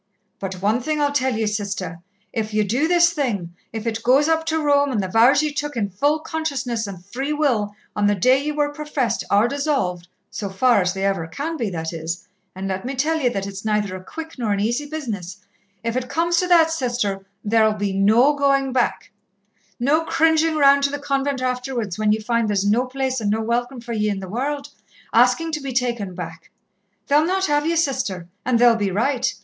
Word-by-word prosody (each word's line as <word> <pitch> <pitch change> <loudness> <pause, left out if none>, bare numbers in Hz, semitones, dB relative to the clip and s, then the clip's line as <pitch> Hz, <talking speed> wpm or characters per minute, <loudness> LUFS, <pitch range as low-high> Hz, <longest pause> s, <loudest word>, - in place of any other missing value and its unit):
"But 190 -1 -6
one 220 +5 +2
thing 305 +4 -1
I'll 290 -1 +2
tell 260 -3 +1
ye, 220 0 0
Sister. 200 -5 -3 0.3
If 215 -2 -3
ye 215 - +3
do 245 +10 +1
this 345 0 +4
thing 210 - -2 0.2
if 220 0 -5
it 225 -1 -2
goes 265 +5 +4
up 320 0 +1
to 320 0 +1
Rome, 285 -2 +3
and 225 - 0
the 190 - -1
vows 235 +9 +5
ye 300 -1 -1
took 290 -2 -3
in 200 -3 -1
full 285 +11 +2
consciousness 275 -9 -3
and 185 -3 -9
free 265 +9 -4
will 235 -9 0 0.2
on 205 -1 +2
the 205 - +3
day 255 +8 +3
ye 300 - 0
were 295 -1 -1
professed, 290 -6 -2
are 205 +3 +4
dissolved 270 - -1 0.2
so 200 - -4
far 220 +2 +3
as 180 0 0
they 195 0 -1
ever 195 -5 0
can 290 - -4
be, 230 -9 -2
that 165 -2 -4
is, 170 +3 -5 0.3
and 190 +1 -4
let 190 0 -3
me 265 +2 -4
tell 315 +5 +1
ye 255 -5 +2
that 195 -5 -3
it's 195 0 -7
neither 210 -3 0
a 185 - -8
quick 320 - -8
nor 225 -3 0
an 200 - +1
easy 240 +8 -1
business 215 - -5 0.5
if 230 0 -2
it 255 0 -2
comes 340 +1 +1
to 360 - +2
that, 330 -2 +5
Sister, 240 -9 -1 0.2
there'll 220 0 +3
be 205 -2 -2
no 220 +9 +4
going 275 -2 +1
back. 250 -2 0 0.7
No 290 +6 +2
cringing 320 0 +2
round 280 -1 +6
to - - +2
the 290 - -3
convent 275 -1 -1
afterwards, 250 -6 -2
when 215 -1 +2
ye 215 - +3
find 230 +1 0
there's 200 -1 +1
no 230 +5 +2
place 260 -1 -2
and 205 - 0
no 220 +2 +1
welcome 240 +3 -1
for 235 0 -6
ye 215 -1 0
in 200 -2 -2
the 190 - -7
world, 280 +7 -3 0.4
asking 330 0 +3
to 305 -1 -3
be 275 -1 -4
taken 235 -7 -1
back. 165 -3 -8 0.6
They'll 295 +2 +4
not 380 +3 +1
have 295 -1 +1
ye, 335 - +1
Sister, 210 - -1 0.2
and 250 -1 +2
they'll 240 0 +6
be 205 -3 0
right. 250 +6 0
245 Hz, 215 wpm, -22 LUFS, 205-285 Hz, 0.7 s, round